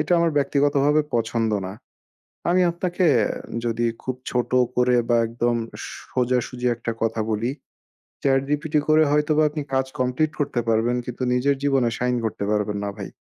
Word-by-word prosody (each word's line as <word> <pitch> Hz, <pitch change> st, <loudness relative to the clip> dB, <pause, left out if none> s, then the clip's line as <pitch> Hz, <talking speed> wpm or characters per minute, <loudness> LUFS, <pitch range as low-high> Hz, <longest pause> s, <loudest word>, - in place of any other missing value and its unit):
এটা 160 Hz, -, 0 dB
আমার 170 Hz, 0 st, +3 dB
ব্যক্তিগতভাবে 145 Hz, +1 st, +2 dB
পছন্দ 115 Hz, -1 st, 0 dB, 0.2 s
না। 95 Hz, -, -6 dB, 0.8 s
আমি 180 Hz, +1 st, +4 dB
আপনাকে 175 Hz, +1 st, -1 dB, 0.2 s
আ -, -, -2 dB, 0.3 s
যদি 120 Hz, 0 st, 0 dB, 0.2 s
খুব 130 Hz, -, -2 dB, 0.2 s
ছোট 125 Hz, -1 st, -1 dB, 0.3 s
করে 125 Hz, 0 st, +3 dB
বা 120 Hz, -, +4 dB
একদম 120 Hz, +1 st, 0 dB, 0.6 s
সোজাসুজি 125 Hz, 0 st, 0 dB
একটা 115 Hz, 0 st, -3 dB
কথা 115 Hz, 0 st, 0 dB
বলি। 110 Hz, +3 st, 0 dB, 0.7 s
Chat 135 Hz, -1 st, +3 dB
GPT 150 Hz, +1 st, -2 dB
করে 155 Hz, +1 st, +6 dB
হয়তোবা 150 Hz, +1 st, +3 dB
আপনি 150 Hz, 0 st, -4 dB
কাজ 130 Hz, 0 st, +2 dB
কমপ্লিট 130 Hz, +5 st, +1 dB
করতে 140 Hz, -4 st, 0 dB
পারবেন 115 Hz, +2 st, +2 dB
কিন্তু 125 Hz, +1 st, -5 dB
নিজের 135 Hz, +3 st, +2 dB
জীবনে 135 Hz, -4 st, +2 dB
সাইন 125 Hz, 0 st, 0 dB
করতে 105 Hz, -2 st, -3 dB
পারবেন 105 Hz, -1 st, 0 dB
না 100 Hz, -, -2 dB
ভাই। 100 Hz, -, -6 dB
125 Hz, 160 wpm, -23 LUFS, 120-145 Hz, 0.8 s, করে